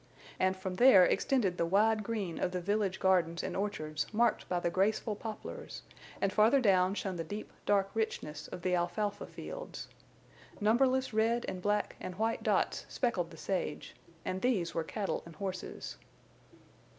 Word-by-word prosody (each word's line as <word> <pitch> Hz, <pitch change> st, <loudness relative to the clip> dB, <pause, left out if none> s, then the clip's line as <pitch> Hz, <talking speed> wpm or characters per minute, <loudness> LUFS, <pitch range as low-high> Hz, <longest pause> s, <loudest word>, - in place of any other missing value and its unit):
And 185 Hz, 0 st, +2 dB
from 185 Hz, -1 st, -4 dB
there 220 Hz, -8 st, +8 dB
extended 200 Hz, -8 st, +1 dB
the 170 Hz, -, +3 dB
wide 215 Hz, +4 st, +3 dB
green 200 Hz, -6 st, -3 dB
of 180 Hz, -, -1 dB
the 180 Hz, -, -1 dB
village 200 Hz, +1 st, 0 dB
gardens 170 Hz, -3 st, +2 dB
and -, -, -3 dB
orchards 155 Hz, -7 st, -2 dB
marked 230 Hz, 0 st, +1 dB
by 180 Hz, -, +1 dB
the 170 Hz, -, -1 dB
graceful 210 Hz, +3 st, +1 dB
poplars; 215 Hz, +1 st, -7 dB, 0.4 s
and 195 Hz, -1 st, 0 dB
farther 220 Hz, +6 st, +5 dB
down 190 Hz, -4 st, +3 dB
shone 190 Hz, -3 st, -3 dB
the 165 Hz, -, -2 dB
deep, 205 Hz, +6 st, -6 dB, 0.2 s
dark 195 Hz, -1 st, +3 dB
richness 220 Hz, -9 st, -3 dB
of 175 Hz, -, -8 dB
the 185 Hz, -, +1 dB
alfalfa 205 Hz, +4 st, -1 dB
fields. -, -, -7 dB, 0.7 s
Numberless 255 Hz, +4 st, +3 dB
red 230 Hz, +2 st, +2 dB
and 185 Hz, -, -4 dB
black 205 Hz, +1 st, 0 dB
and 180 Hz, -, -6 dB
white 225 Hz, +3 st, 0 dB
dots -, -, 0 dB
speckled 195 Hz, -10 st, 0 dB
the 165 Hz, -, -12 dB
sage, 185 Hz, +3 st, -3 dB, 0.3 s
and 185 Hz, +1 st, -2 dB
these 200 Hz, -10 st, +1 dB
were 165 Hz, -, 0 dB
cattle 200 Hz, +4 st, -2 dB
and 170 Hz, -1 st, -12 dB
horses. 185 Hz, +1 st, -5 dB
195 Hz, 165 wpm, -32 LUFS, 180-220 Hz, 0.7 s, there